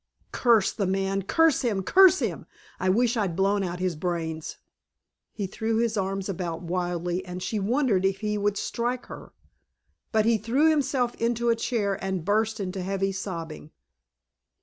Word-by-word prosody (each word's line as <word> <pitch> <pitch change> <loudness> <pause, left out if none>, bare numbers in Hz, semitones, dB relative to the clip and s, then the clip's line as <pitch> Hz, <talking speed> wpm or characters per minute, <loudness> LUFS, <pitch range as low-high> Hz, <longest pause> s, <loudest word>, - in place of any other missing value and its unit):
"Curse 230 -5 +3
the 200 - -1
man! 195 +1 0
Curse 320 - +3
him! 210 -6 0
Curse 375 - +6
him! - - -3 0.3
I 185 - +1
wish 235 +5 +2
I'd 195 -7 -1
blown 195 +2 +2
out 180 -1 -3
his 180 -2 -1
brains!" 160 -1 -3 0.7
He 205 - -4
threw 220 +4 -2
his 230 -1 +1
arms 195 -1 -2
about 175 -3 -4
wildly 175 0 -2
and 180 0 -7
she 215 - -2
wondered 220 -2 +1
if 195 +1 0
he 210 -1 -1
would 205 0 0
strike 240 +3 -2
her. - - -10 0.8
But 220 -1 +2
he 230 -1 +3
threw 265 +9 +2
himself 265 -5 0
into 235 0 +1
a 230 - +4
chair 205 -4 -1
and 190 -4 -2
burst 220 +2 +1
into 190 -1 -3
heavy 195 +1 -1
sobbing. 165 -6 -6
195 Hz, 165 wpm, -26 LUFS, 185-230 Hz, 0.8 s, Curse